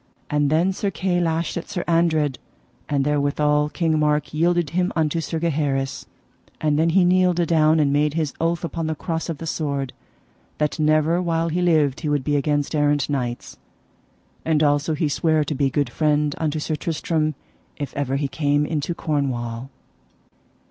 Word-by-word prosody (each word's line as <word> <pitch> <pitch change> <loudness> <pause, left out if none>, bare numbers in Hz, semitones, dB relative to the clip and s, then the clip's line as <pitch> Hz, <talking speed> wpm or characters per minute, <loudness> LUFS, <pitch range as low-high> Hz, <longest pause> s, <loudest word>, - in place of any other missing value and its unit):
And 145 -1 +2
then 170 +5 +2
Sir 200 +2 -2
Kay 185 -2 -1
lashed 165 0 -1
at 170 - -6
Sir 175 -3 -3
Andred, 160 -5 +2 0.5
and 140 -2 +1
therewithal 150 0 +1
King 160 0 0
Mark 150 -1 +1
yielded 170 0 +1
him 180 +1 0
unto 160 0 +1
Sir 160 +1 -3
Gaheris. 145 -4 -1 0.5
And 150 -1 +1
then 165 +1 +3
he 180 +2 +4
kneeled 180 -1 +3
adown, 160 -2 +3
and 140 -2 +2
made 150 +1 +1
his 155 -4 -1
oath 165 0 0
upon 165 0 -3
the 160 - -1
cross 165 +2 -3
of 165 - -3
the 165 - -7
sword, 140 -5 -2 0.6
that 150 +2 -1
never 155 +3 +3
while 165 -1 0
he 175 +3 -1
lived 155 -6 +2
he 155 - -3
would 145 -2 0
be 145 +1 0
against 145 +1 0
errant 145 -1 +1
knights. 125 -4 -4 0.8
And 155 -1 +2
also 145 +2 +2
he 155 +1 0
sware 155 +1 +1
to 150 - -3
be 140 -1 +1
good 140 -2 -1
friend 150 0 +1
unto 155 -1 -1
Sir 155 +1 -2
Tristram 155 -1 -1 0.4
if 145 - -5
ever 140 -1 -1
he 140 0 0
came 145 +1 +1
into 155 +2 -2
Cornwall. 130 -6 -2
155 Hz, 175 wpm, -22 LUFS, 145-165 Hz, 0.8 s, he